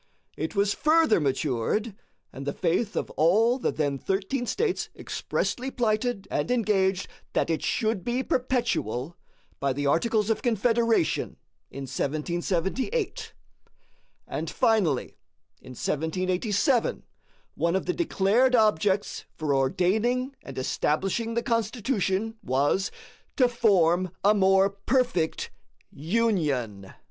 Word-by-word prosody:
It 160 +7 -4
was 200 0 +2
further 315 - +3
matured, 145 - -1 0.4
and 135 +1 -7
the - - -1
faith 190 +5 0
of - - -2
all 220 - +3
the - - 0
then 145 -3 -1
thirteen 200 - -2
States 415 - -1
expressly 255 +2 -3
plighted 220 -4 -1
and 145 +1 -1
engaged 195 -6 +1 0.3
that - - +1
it 160 - -1
should 220 -5 0
be 245 +2 -1
perpetual, 230 - -1 0.4
by 140 -1 0
the 145 +2 -3
Articles 215 +8 +2
of 225 - -1
Confederation 230 -4 +1 0.3
in 140 - -7
1778. 180 - -2 0.9
And, - - -4
finally, 190 - +1 0.4
in 130 - -11
1787 185 - 0 0.5
one 170 +1 0
of 190 - -1
the 360 - 0
declared 250 - +2
objects 205 -2 +1
for 150 -2 -1
ordaining 215 - +1
and 135 -1 -10
establishing 195 - -1
the 235 - 0
Constitution 225 -2 -1
was 145 - +1 0.5
"TO 255 - +4
FORM 185 -7 +3
A 205 +2 +6
MORE 195 -1 +4
PERFECT 200 -4 0 0.4
UNION." 145 - -1
200 Hz, 115 wpm, -26 LUFS, 160-235 Hz, 0.9 s, A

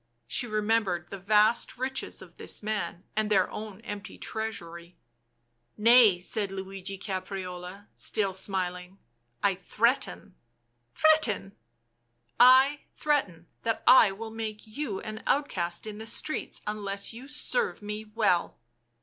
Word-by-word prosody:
She 240 - 0
remembered 210 -5 0
the 195 - -6
vast 215 +5 +3
riches 265 +1 -3
of - - -17
this - - -4
man 210 -4 -3
and 215 0 +1
their 190 -3 +4
own 210 -1 -7
empty 205 -3 -7
treasury. 175 -6 -6
tc 120 -1 -46
Nay," 225 -3 +7
said 200 +3 -1
Luigi 195 0 -6
Caprarola, 185 -1 -6
still 200 -3 0
smiling. 185 -1 -2 0.2
" 120 0 -43
I 200 - +4
threaten." 210 +2 0 0.3
" 120 0 -46
Threaten 310 -11 +3 0.3
!" 120 0 -48 0.2
" 120 - -41
I 265 +3 +7 0.2
threaten 200 - 0 0.2
that 225 -1 -1
I 245 -5 +8
will 220 +3 -7
make 220 -1 -5
you 215 -2 -4
an 215 0 -7
outcast 180 -13 0
in 215 -1 -7
the 220 - -6
streets 310 +7 -3
unless 200 -1 -3
you 250 +4 -10
serve 305 - -1
me 210 +1 -5
well." 210 -5 +1
205 Hz, 140 wpm, -28 LUFS, 180-225 Hz, 0.3 s, I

